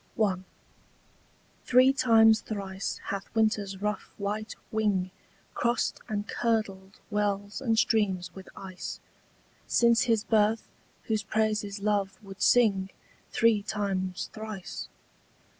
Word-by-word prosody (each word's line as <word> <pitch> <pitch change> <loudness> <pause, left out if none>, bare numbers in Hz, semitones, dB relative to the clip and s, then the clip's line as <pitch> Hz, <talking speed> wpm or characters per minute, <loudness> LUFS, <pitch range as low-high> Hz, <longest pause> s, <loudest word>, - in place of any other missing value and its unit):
THREE 255 +2 +6
times 225 -4 +5
thrice 195 -2 -4
hath 200 0 -4
winter's 210 -3 0
rough 210 0 -2
white 210 +2 -3 0.2
wing 205 -4 +1 0.4
Crossed 240 +1 0
and 210 0 -2
curdled 205 -4 -2
wells 205 0 -1
and 230 -4 +1
streams 200 -6 +1
with 190 -1 -11
ice 185 -1 -7 0.7
Since 235 -1 +4
his 225 -3 +2
birth 220 0 +2 0.4
whose 220 -2 0
praises 210 -1 -1
love 200 -2 0
would 195 -1 -11
sing 200 -6 +4 0.4
Three 230 -3 +3
times 195 -3 -2
thrice. 215 -4 -6
210 Hz, 105 wpm, -28 LUFS, 195-220 Hz, 0.7 s, THREE